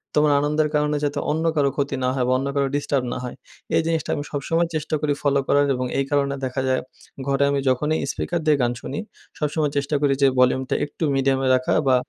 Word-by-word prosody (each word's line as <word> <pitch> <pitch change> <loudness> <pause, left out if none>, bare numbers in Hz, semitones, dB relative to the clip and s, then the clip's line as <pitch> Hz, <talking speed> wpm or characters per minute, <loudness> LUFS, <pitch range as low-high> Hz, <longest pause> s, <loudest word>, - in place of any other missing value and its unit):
তোমার 150 0 +4
আনন্দের 150 +1 +1
কারণে 150 0 +1
যাতে 145 0 -1
অন্য 160 +2 -1
কারো 140 -2 +3
ক্ষতি 140 -1 -1
না 125 - +2
হয় 125 - +1
বা 125 - +2
অন্য 135 - -2
কারো 140 -1 +2
ডিস্টার্ব 145 -2 0
না - - -4
হয়। 125 - -6 0.4
এই - - +4
জিনিসটা 165 -2 -1
আমি 145 - -3
সবসময় 165 +4 0
চেষ্টা 155 0 -1
করি 145 -1 +1
ফলো 140 -1 +2
করার 145 0 +4
এবং 125 0 -2
এই 135 - +1
কারণে 140 -1 +1
দেখা 130 +1 -2
যায় 130 0 +1 0.5
ঘরে 140 0 +2
আমি 140 -1 +1
যখনই 150 +5 +1
স্পিকার 175 - -2
দিয়ে 150 -2 +4
গান 120 -1 +2
শুনি - - -5 0.4
সবসময় 150 -1 0
চেষ্টা 140 +1 0
করি 140 -1 +3
যে, 140 - +6
ভলিউমটা 125 +1 +2
একটু 145 +3 -7
মিডিয়ামে 135 0 +1
রাখা 130 0 0
বা 130 - +5
140 Hz, 220 wpm, -23 LUFS, 135-150 Hz, 0.5 s, যে